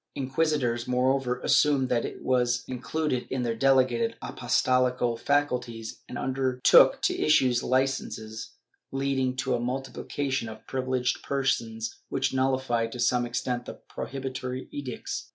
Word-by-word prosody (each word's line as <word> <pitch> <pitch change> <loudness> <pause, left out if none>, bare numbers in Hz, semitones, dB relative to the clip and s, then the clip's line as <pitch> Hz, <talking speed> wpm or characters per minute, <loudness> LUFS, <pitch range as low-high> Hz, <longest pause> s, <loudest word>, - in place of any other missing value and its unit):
Inquisitors, 135 -3 0
moreover, 125 0 +1
assumed 140 -3 +3
that 120 -1 +2
this - - -5
was 125 -1 +1
included 130 +1 -2
in 130 -1 -1
their 115 -1 0
delegated 125 -2 +3
apostolical 125 -2 +1
faculties 125 -4 -1
and 125 - -5
undertook 130 -1 +4
to - - +2
issue 135 -5 +4
licences, 130 -4 -2 0.4
leading 135 -1 0
to 130 0 -1
a 120 - +1
multiplication 130 0 -3
of 110 0 -11
privileged 130 -2 -1
persons 115 -5 -1
which 135 0 0
nullified 130 -3 +1
to 125 - -7
some 120 0 +2
extent 120 0 -2
the - - -7
prohibitory 130 -1 -6
edicts. 135 -4 -5
130 Hz, 125 wpm, -27 LUFS, 120-135 Hz, 0.4 s, undertook